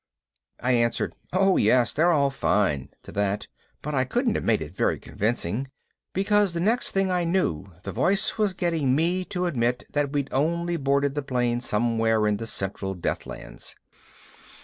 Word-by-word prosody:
I 125 - +1
answered, 115 -1 +1 0.2
"Oh 190 +1 +3
yes, 115 +2 +3
they're 160 +7 +3
all 140 -5 +3
fine," 85 - +1
to - - -10
that, 100 0 -1 0.4
but 150 - -3
I 130 -2 +3
couldn't 240 - 0
have - - -2
made 110 -2 +2
it 75 - -11
very - - +1
convincing, 110 +3 -2 0.4
because 200 -1 +2
the 170 - -2
next 225 +8 +1
thing 195 -1 +1
I 180 -1 +1
knew 165 - 0
the - - -4
voice 195 +2 +1
was 210 -4 +1
getting 160 -7 +1
me 175 +5 +1
to 180 0 -2
admit 125 -7 0
that 145 -1 0
we'd 145 -1 -1
only 170 +5 +1
boarded 140 -2 +1
the 145 - -1
plane 120 -3 0
somewhere 115 -1 +1
in 105 -1 +2
the 115 - -5
Central 95 -1 -3
Deathlands. 90 - -5
135 Hz, 170 wpm, -25 LUFS, 115-175 Hz, 0.4 s, Oh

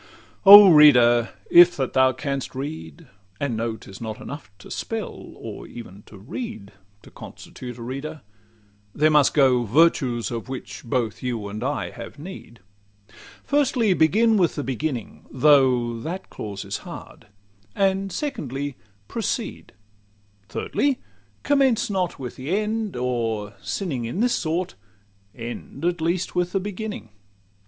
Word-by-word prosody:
LXXIII - - -25
O 205 0 +12
reader! 120 -6 +6 0.2
if 175 0 +8
that 135 -2 -2
thou 130 0 +4
canst 135 +1 -4
read, 155 +3 -7 0.3
and 140 -5 -1
know, 115 0 -2
'T - - -16
is 95 - -11
not 110 -2 -5
enough 145 -8 -8
to 95 - -14
spell, - - -5
or - - -9
even 105 -4 -11
to 105 - -13
read, 110 - -7 0.3
To - - -15
constitute 125 -2 -10
a 120 - -8
reader; 135 +5 -6 0.7
there 155 +1 +3
must 150 -2 +4
go 130 -4 +4
Virtues 125 -1 +2
of 120 +2 -5
which 100 -7 -7
both 115 -3 -2
you 120 -5 -3
and 105 +3 -6
I 145 +3 -2
have - - -10
need; 145 - -10 0.8
Firstly, 260 -7 +2
begin 215 +8 +3
with 175 -4 +2
the 145 - -3
beginning 130 -2 -4
(though 130 -4 +3
That 175 +10 -6
clause 100 -2 -6
is - - -3
hard); - - -11 0.5
and 195 0 +1
secondly, 145 - -4 0.3
proceed; - - -4 0.8
Thirdly, 275 - 0 0.5
commence 270 -4 +2
not 185 -3 -1
with 125 -3 -7
the 150 +10 -1
end 215 -1 -2
or, 115 -4 -2
sinning 140 - -3
In 120 +11 -4
this 245 +2 +2
sort, 170 +2 -2 0.6
end 120 +5 -7
at 175 -1 0
least 170 +2 -1
with 180 0 -1
the 195 - +2
beginning. 205 - -6
140 Hz, 145 wpm, -23 LUFS, 120-185 Hz, 0.8 s, O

